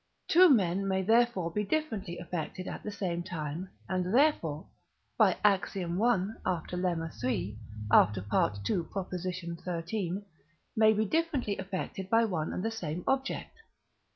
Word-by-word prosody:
Two 360 +2 +7
men 195 - +3
may 190 0 +1
therefore 220 -5 +3
be 210 +4 -1
differently 210 - -2
affected 175 +1 -5
at - - -5
the - - -5
same 180 -4 -2
time, 175 -1 -5 0.2
and 185 -1 -1
therefore 175 - +2 0.5
(by - - +4
Ax. 195 -2 +2
i. - - -1 0.6
after 180 -1 -2
Lemma 170 -3 -1
iii. 110 -4 -1 0.3
after 100 -3 +5 0.4
II. 180 -2 -3 0.2
xiii.) 180 +2 -3 0.5
may 220 0 +6
be 215 +1 +1
differently 285 -6 0
affected 190 0 -4
by 230 +1 +4
one 165 -7 -2
and 180 - -3
the 225 - 0
same 175 -6 -4
object. 270 +10 -2
185 Hz, 135 wpm, -30 LUFS, 170-215 Hz, 0.6 s, Two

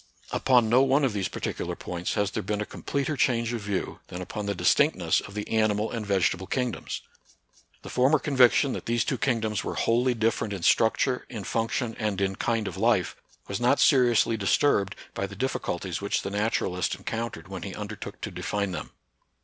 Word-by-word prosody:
Upon 125 -4 +3
no 120 +4 +5
one 135 +2 +3
of 125 - 0
these 100 -2 -1
particular - - -4
points 90 0 -4
has 105 -1 +1
there - - -2
been 105 +2 -2
a 105 - -2
completer 140 +6 -3
change 120 -3 +1
of 115 - -3
view 100 -2 -3
than 90 - -7
upon 100 +3 -5
the 100 - -1
distinctness - - +3
of 105 - -11
the 105 - -4
animal 110 -1 +1
and 115 -2 -3
vege 100 -3 +2
table 95 +1 -6
kingdoms. 125 -3 -2 0.8
The - - -8
former 135 +5 +4
conviction 130 -1 +4
that - - -6
these 120 0 +1
two - - -1
kingdoms 110 -5 0
were - - -4
wholly 120 +2 +2
different 110 -1 0
in 95 -4 -5
structure, 115 +6 +2
in 110 -5 -6
function, 115 +2 -1
and 105 -3 -1
in 95 0 0
kind 115 -3 0
of - - -5
life, - - +2 0.3
was - - -3
not - - +3
seriously 120 -3 +4
disturbed 100 0 +2 0.2
by 100 0 -2
the 100 - -10
difficulties 95 -7 -2
which 100 - -1
the 100 - -4
naturalist 100 -4 0
encountered 115 +5 -5
when 95 -2 -6
he 95 0 -6
undertook 105 0 -7
to - - -4
define 100 -2 -2
them. 85 - -5
110 Hz, 190 wpm, -27 LUFS, 100-120 Hz, 0.8 s, no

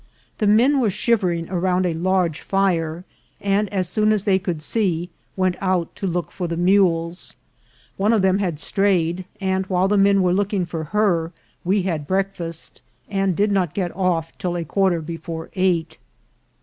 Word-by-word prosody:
The 210 - +2
men 245 +7 +4
were 235 -5 +2
shivering 185 -6 0
around 180 0 +1
a 175 - 0
large 175 -1 0
fire, 175 -3 0 0.3
and, 200 +1 +1
as 190 -3 0
soon 215 +4 +2
as 210 -3 +1
they 195 -2 +3
could 175 -5 -4
see, 180 -4 -1 0.2
went 185 -1 0
out 185 -3 0
to 195 - -2
look 175 -1 -2
for 180 - -4
the 170 0 -3
mules. 175 -2 +1 0.6
One 205 +3 +2
of 220 -4 +2
them 190 +1 +3
had 175 -7 -2
strayed; 185 -2 +1
and 190 -1 -1
while 185 0 +2
the 205 0 +2
men 195 -1 +4
were 180 -1 +2
looking 200 -1 0
for 165 -2 -5
her, 175 -3 +1 0.3
we 190 +2 +1
had 160 -6 -2
breakfast, 185 -4 -3 0.3
and 195 -2 +1
did 205 +3 +2
not 185 -6 0
get 180 -3 -2
off 175 -3 -1
till 175 -1 -2
a 170 - -3
quarter 185 0 +1
before 165 0 -6
eight. 180 -3 0
185 Hz, 175 wpm, -22 LUFS, 170-195 Hz, 0.6 s, men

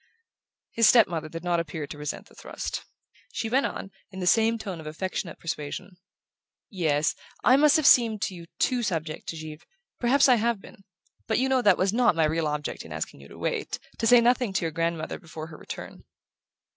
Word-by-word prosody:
His 230 -1 +5
step 230 -4 +7
mother 160 -3 -4
did 165 +1 -7
not 175 -1 +1
appear 165 -2 -4
to 150 - -9
resent 150 0 -5
the - - -20
thrust. - - -6 0.5
She 225 - -2
went 270 +3 +3
on, 195 - -7 0.2
in 190 - -9
the 180 - -2
same 225 +4 +4
tone 195 -6 -6
of 155 - -9
affectionate 175 +3 -4
persuasion: 165 +3 -5 0.8
"Yes: 155 -6 +1 0.3
I 255 - +6
must 295 +2 +5
have 310 -3 +2
seemed 225 -6 +5
to 220 -3 -2
you 170 -2 -10
too 250 -2 +1
subject 165 -7 -3
to 165 - -4
Givre. 155 0 -8 0.4
Perhaps 265 +4 +4
I 250 -2 +6
have 230 -1 0
been. 195 0 -16 0.4
But 220 - +1
you 260 - +2
know 265 -1 +2
that 205 -5 +5
was 190 +2 +1
not 235 -5 +3
my 160 -1 +3
real 160 +1 0
object 150 0 -3
in - - -12
asking - - -5
you 70 - -13
to - - -13
wait, - - -2 0.2
to 225 - +1
say 245 +1 +7
nothing 245 -3 +2
to - - +1
your 165 - -1
grandmother 165 0 -2
before 155 -1 -8
her 155 - -11
return." - - -9
185 Hz, 210 wpm, -26 LUFS, 160-230 Hz, 0.8 s, step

